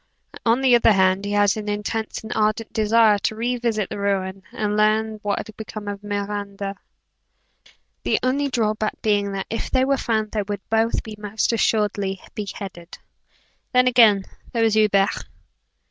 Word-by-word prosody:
On 235 +3 +3
the 260 -2 +4
other 230 -2 +5
hand, 190 0 +2
he 205 - -2
had 205 -1 +3
an 210 -1 -4
intense 210 +2 -3
and 220 - -5
ardent 215 +1 0
desire 220 -1 +4
to 220 - -1
re 240 +3 -1
visit 225 -4 -1
the - - -4
ruin, 195 -1 -1
and 210 -1 -2
learn 215 +1 +2
what 205 -1 -1
had 220 - -7
become 215 -1 -8
of 205 0 -5
Miranda 200 -1 -4 1.3
the - - +1
only 275 +3 +1
draw 225 -5 +1
back 215 0 -3
being 205 -2 +1
that, 195 -1 -3
if 225 - -3
they 260 0 +2
were 275 0 +2
found 220 -3 -1
they 215 - -1
would 205 0 -6
both 225 +1 +1
be 220 - -8
most 210 +2 -1
assuredly 205 -4 0
beheaded. 195 -4 -7 0.8
Then, 250 0 +5
again, 220 -6 +5 0.3
there 230 -1 +1
was 225 -1 +3
Hubert. 205 -2 +2
215 Hz, 170 wpm, -22 LUFS, 200-225 Hz, 1.3 s, other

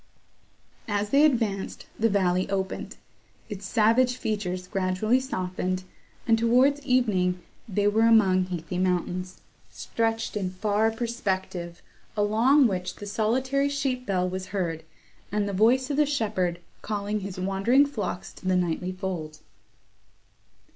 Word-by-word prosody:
As 205 -1 -1
they 280 +2 +5
advanced, 225 -9 0
the 225 +1 +3
valley 185 -2 +1
opened; 190 -1 -3 0.5
its 200 -2 -6
savage 240 +3 +3
features 185 -5 -3
gradually 195 +6 +1
softened, 185 -6 -3 0.4
and, 225 0 +3
towards 255 +5 +3
evening, 200 -9 +1 0.3
they 205 +1 +1
were 220 +2 +4
among 190 -5 +5
heathy 180 0 -4
mountains, 180 0 -1 0.3
stretched 225 -1 -2
in 195 -3 -1
far 210 +3 +1
perspective, 190 -7 -3 0.3
along 230 +7 +4
which 185 -5 -1
the 205 - -9
solitary 260 +7 0
sheep 265 -3 -2
bell 185 -2 +1
was 185 +1 -4
heard, 170 -5 -2 0.5
and 205 0 0
the 200 - -3
voice 250 +7 +3
of 285 - -1
the 300 -1 +4
shepherd 205 -11 0 0.2
calling 210 0 -2
his 195 -2 -6
wandering 195 +9 +3
flocks 210 -10 -4
to 185 - -9
the 185 - +3
nightly 180 0 -1
fold. 180 -5 -5
205 Hz, 130 wpm, -26 LUFS, 185-230 Hz, 0.5 s, they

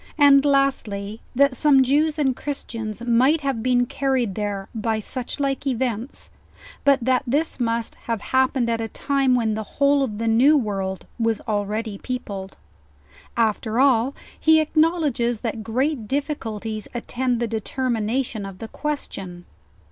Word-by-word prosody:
And 280 -2 +7
lastly, 230 -7 0
that 280 0 +4
some 275 0 +5
Jews 295 +4 +2
and 270 -4 +1
Christians 230 -6 -5
might 255 +7 +3
have 270 -5 -1
been 245 0 +2
carried 260 -5 0
there 200 -1 -3
by 220 0 -1
such 245 +5 -5
like 275 0 -1
events, 245 -1 -2 0.5
but 280 -2 +4
that 255 -1 +3
this 290 +4 0
must 230 -1 -1 0.2
have 230 -2 0
happened 260 -1 +3
at 230 -1 0
a 225 - -2
time 270 +2 +1
when 225 -3 +1
the 215 - -2 0.2
whole 280 0 +4
of 220 -6 -2
the 230 +1 -2
new 255 +7 +5
world 195 -6 -2
was 225 -1 +1
already 210 -1 -2
peopled. 200 -7 -5 0.8
After 225 0 +1
all, 265 -1 +3 0.2
he 320 0 +5
acknowledges 310 -7 +1
that 225 -1 -3
great 250 +1 -1
difficulties 225 -7 -3
attend 245 0 -1
the 235 - 0
determination 230 0 -2
of 195 -1 -8
the 220 +3 -8
question. 195 -12 -5
240 Hz, 145 wpm, -23 LUFS, 220-275 Hz, 0.8 s, And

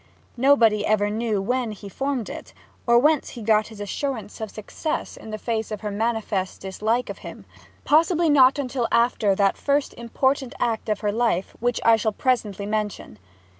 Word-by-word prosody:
Nobody 235 -5 +4
ever 210 -1 +1
knew 215 -2 -1
when 245 0 -1
he 200 0 -10
formed 270 +3 -3
it, - - -9 0.3
or 235 0 +6
whence 300 +3 +3
he 235 - -8
got 215 0 +3
his 220 -2 -12
assurance 220 0 -4
of 220 - -4
success 215 +10 -4
in - - -11
the 215 - -4
face 220 0 -2
of 215 -2 -5
her 210 -1 -3
manifest 215 -3 -2
dislike 220 +6 -1
of - - -10
him. - - -10 0.4
Possibly 330 +2 +3
not 275 -2 +6
until 255 -3 -1
after 235 -4 +2
that 195 0 +2
first 285 0 0
important 265 +2 -1
act 230 -2 -1
of 210 -1 -1
her 210 -1 0
life 225 -4 0
which 245 0 0
I 230 -1 +6
shall 220 0 -1
presently 210 -5 -1
mention. 210 - -4
225 Hz, 175 wpm, -24 LUFS, 210-255 Hz, 0.4 s, or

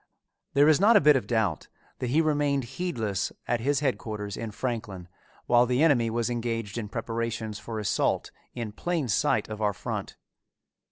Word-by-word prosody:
There 145 +1 +6
is 155 -1 +5
not 215 +4 +6
a - - +7
bit 150 0 +6
of 130 - -1
doubt 110 -9 0 0.3
that 125 - -2
he 150 +6 +3
remained 145 -3 +1
heedless 115 - -2 0.2
at 120 0 +1
his 140 +4 +1
headquarters 105 -7 -2
in 115 - -5
Franklin 105 -6 -4 0.4
while 120 0 +4
the 125 +4 +2
enemy 125 -8 +4
was 115 0 -1
engaged 115 -3 -3
in 105 -3 -5
preparations 115 -1 -3
for 115 -1 -6
assault 105 -2 0 0.2
in 115 -3 -4
plain 165 +4 -2
sight 100 - +2
of 110 0 -6
our 105 -1 +2
front. - - -5
120 Hz, 170 wpm, -27 LUFS, 110-140 Hz, 0.4 s, a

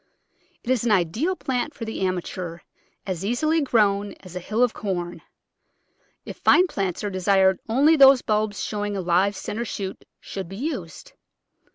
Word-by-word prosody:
It 245 - -2
is 255 -4 +1
an 240 - +1
ideal 215 - +1
plant 260 -1 -3
for 230 - -6
the 220 - -5
amateur, 180 -2 -3 0.5
as 185 -2 -4
easily 310 +10 +1
grown 205 -6 +2
as 185 -1 -12
a - - -2
hill 215 +7 0
of 245 - +2
corn. 175 -4 -4 1.0
If - - -8
fine 360 - +5
plants 195 - -3
are 205 - -2
desired 190 0 +3
only 285 +8 +4
those 270 -3 +7
bulbs 215 -2 -1
showing 205 -1 -3
a - - -2
live 180 +3 +2
centre 225 +3 -4
shoot 195 -4 -5 0.2
should 190 -3 -7
be 195 - -8
used. 245 - -5
205 Hz, 165 wpm, -24 LUFS, 185-245 Hz, 1.0 s, those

